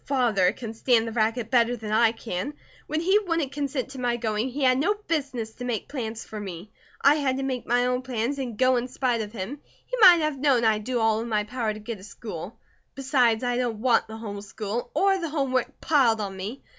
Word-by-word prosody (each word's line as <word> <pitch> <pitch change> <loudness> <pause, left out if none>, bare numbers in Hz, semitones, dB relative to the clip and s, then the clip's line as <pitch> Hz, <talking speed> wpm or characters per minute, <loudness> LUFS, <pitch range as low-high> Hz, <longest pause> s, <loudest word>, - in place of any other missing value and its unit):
Father 230 -9 +3
can 225 0 -7
stand 230 0 +2
the - - -3
racket 225 +1 0
better 240 -1 +3
than 220 -2 -6
I 220 +1 +4
can. 225 +4 -5 0.3
When 310 +2 -1
he 380 +5 +4
wouldn't 330 -8 -1
consent 280 -2 -3
to 265 -1 -9
my 240 -1 0
going, 220 +1 -1
he 275 +3 -3
had 255 0 +4
no 390 +9 +2
business 280 - -3
to 250 - -9
make 240 -3 -3
plans 230 -5 -5
for 215 - -7
me. 190 0 -7 0.3
I 280 - +6
had 265 -3 0
to 270 - -2
make 260 -2 -3
my 245 +1 +3
own 250 0 0
plans 255 +2 -2
and 245 -5 -4
go 255 +1 +4
in 240 +1 -2
spite 245 -2 0
of 210 -1 -5
him; 230 +6 -6 0.3
he - - -3
might 355 -4 +9
have 305 -3 -1
known 260 -4 +3
I'd 215 -1 +2
do 250 -1 -1
all 220 -1 +2
in 235 +1 -4
my 210 -2 +1
power 225 0 -2
to - - -8
get 215 -1 -6
a - - -14
school. 205 -2 -8 0.4
Besides, 255 -4 +2
I 245 -1 0
don't 240 -3 -1
want 240 +1 +2
the 220 0 -8
home 205 -3 -6
school, 210 +3 -4
or 390 0 +3
the 335 -3 -3
home 280 -4 -1
work 255 -1 -1
piled 255 -8 +3
on 200 -2 -4
me. 205 +8 -6
245 Hz, 235 wpm, -26 LUFS, 220-270 Hz, 0.4 s, might